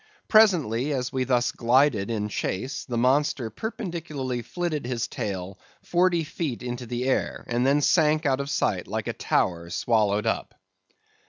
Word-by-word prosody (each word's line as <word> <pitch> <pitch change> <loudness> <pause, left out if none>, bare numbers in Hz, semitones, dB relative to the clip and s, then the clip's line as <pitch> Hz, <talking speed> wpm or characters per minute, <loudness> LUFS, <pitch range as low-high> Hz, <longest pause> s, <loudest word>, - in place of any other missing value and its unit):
Presently, 150 - +4
as 125 -2 -2
we 130 -1 0
thus 125 -1 +2
glided 120 -3 +2
in 105 -2 -1
chase, 105 +5 -3
the 120 -3 -3
monster 130 -1 +1
perpendicularly 165 - -4
flitted 170 +3 -3
his 125 -2 -2
tail 95 -1 -5 0.2
forty 175 -1 +2
feet 150 -5 -4
into 120 0 -5
the 120 +1 -3
air, 135 - 0
and 120 +2 0
then 145 +2 +3
sank 155 0 +3
out 135 -2 +2
of 140 0 -3
sight - - 0
like - - -3
a - - -2
tower 85 -2 0
swallowed 105 0 +1
up. - - -2
130 Hz, 155 wpm, -25 LUFS, 115-150 Hz, 0.2 s, Presently